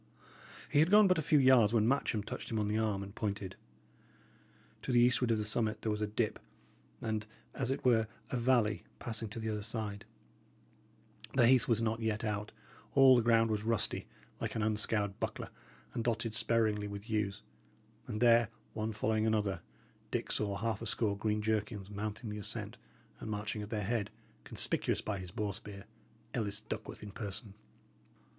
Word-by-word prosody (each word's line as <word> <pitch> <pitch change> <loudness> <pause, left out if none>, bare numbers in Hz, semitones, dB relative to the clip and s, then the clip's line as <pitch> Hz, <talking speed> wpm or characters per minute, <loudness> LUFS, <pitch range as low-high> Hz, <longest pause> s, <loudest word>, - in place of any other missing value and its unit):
He 145 - +2
had 160 +3 +5
gone 210 +1 +7
but 185 -3 +3
a - - +2
few 155 0 +3
yards, 130 -5 +6
when 110 -1 +4
Matcham 120 -5 +1
touched - - -6
him 115 - -1
on 105 -1 +1
the 105 +1 0
arm, 105 -3 0
and 100 0 -9
pointed. 100 -3 -3 1.3
To - - -3
the 120 - +5
eastward 125 0 +4
of 115 - +3
the 105 - -2
summit 110 0 0
there 110 - +1
was 105 0 -2
a 105 - +1
dip, 110 +1 -1 0.6
and, 110 -1 -2 0.3
as 130 -2 -2
it 135 0 -2
were, 115 -3 +4 0.2
a - - -1
valley 115 -4 +2
passing 115 -2 -4
to 110 - -6
the 110 0 -2
other 105 -1 -2
side; 105 -2 -4 1.3
the 120 - +6
heath 125 -1 +5
was 115 -1 +2
not 110 0 0
yet 110 -2 -1
out; 105 -1 -2 0.4
all 135 -1 +8
the 120 - +4
ground 115 -1 +4
was 105 -1 0
rusty, 115 -1 0 0.3
like - - -3
an 110 - 0
unscoured 105 -1 +1
buckler, - - -3 0.4
and 115 - -2
dotted 115 -1 0
sparingly 110 -2 +1
with 100 +1 -7
yews; 105 -2 -1 0.6
and 105 - -3
there, 120 -1 +6 0.3
one 110 0 -2
following 110 +1 +1
another, 105 -5 +1 0.5
Dick - - -2
saw 100 -2 0
half 110 0 -2
a 115 - -3
score 105 0 +1
green 105 +1 -1
jerkins 105 -2 -1
mounting 105 +2 -4
the 105 - -5
ascent, 100 - -5 0.4
and - - -6
marching 105 0 -3
at 105 - -6
their 105 -1 -2
head, 110 -1 0 0.4
conspicuous - - +1
by 105 -2 -3
his 90 -1 -7
boar 105 +3 -2
spear, 100 0 -9 0.5
Ellis 105 -1 -1
Duckworth 110 0 -6
in 105 - -7
person. 100 0 -6
110 Hz, 180 wpm, -33 LUFS, 105-115 Hz, 1.3 s, all